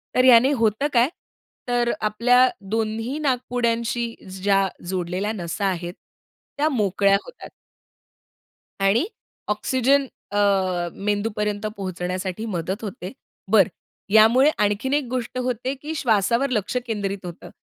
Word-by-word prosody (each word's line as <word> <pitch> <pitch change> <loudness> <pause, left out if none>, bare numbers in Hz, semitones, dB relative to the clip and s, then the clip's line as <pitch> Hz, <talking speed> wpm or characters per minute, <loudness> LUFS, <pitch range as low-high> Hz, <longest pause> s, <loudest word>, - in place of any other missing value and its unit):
तर 255 - +4
याने 255 +2 +7
होतं 230 +1 +1
काय? 240 +3 +4 0.6
तर 240 -1 +1
आपल्या 240 +4 +4 0.2
दोन्ही 225 +4 -2
नाकपुड्यांशी 240 -3 -1 0.3
ज्या 195 0 +3 0.2
जोडलेल्या 185 +3 -2
नसा 190 +1 -3
आहेत, 175 -2 -2 0.6
त्या 300 +2 +2
मोकळ्या 200 -6 +2
होतात. - - -11 1.3
आणि 195 - +3 0.5
ऑक्सिजन 265 +4 +2 0.3
अ, 205 - -2 0.7
मेंदूपर्यंत 210 0 -1
पोहोचण्यासाठी 185 +2 -4
मदत 190 +1 -3
होते. 185 -2 -6 0.4
बरं, 200 -5 +5 0.4
यामुळे 235 +6 +6
आणखीन 210 +7 0
एक 295 - +2
गोष्ट 255 0 -3
होते, 250 +1 -2
की 310 +2 -5
श्वासावर 235 +1 +2
लक्ष 215 -1 -2
केंद्रित 200 -3 -3
होतं. 175 -2 -9
220 Hz, 110 wpm, -23 LUFS, 195-250 Hz, 1.3 s, याने